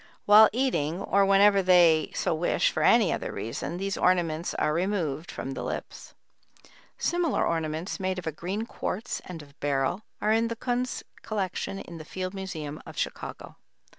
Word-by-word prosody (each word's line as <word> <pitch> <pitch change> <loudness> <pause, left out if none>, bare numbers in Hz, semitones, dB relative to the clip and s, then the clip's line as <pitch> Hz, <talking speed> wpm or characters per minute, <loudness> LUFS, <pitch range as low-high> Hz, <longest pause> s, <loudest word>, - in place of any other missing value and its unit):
While 210 +1 +8
eating, 200 - 0
or 195 0 +2
whenever 200 0 +5
they 175 -4 +5
so - - 0
wish 160 +2 +1
for - - -2
any - - +5
other - - -3
reason, 115 +9 -4
these 195 +1 -2
ornaments 175 -2 +1
are 150 - +1
removed 170 -4 -1
from 135 - -5
the - - -5
lips." - - -6 0.8
Similar 345 -4 +1
ornaments, 160 +3 -2
made 185 -1 -1
of 180 - -6
a 160 - -1
green 190 +8 -4
quartz 230 0 -4
and 165 -4 -8
of 140 0 -20
beryl, 140 +6 0 0.2
are 215 - +1
in 225 +1 +2
the 230 - -3
Kunz 245 +1 -2 0.2
collection 195 -2 -3
in 170 -3 -9
the - - -7
Field 185 +3 -5
Museum 160 -6 -6
of - - -12
Chicago. - - -5
185 Hz, 165 wpm, -27 LUFS, 160-205 Hz, 0.8 s, While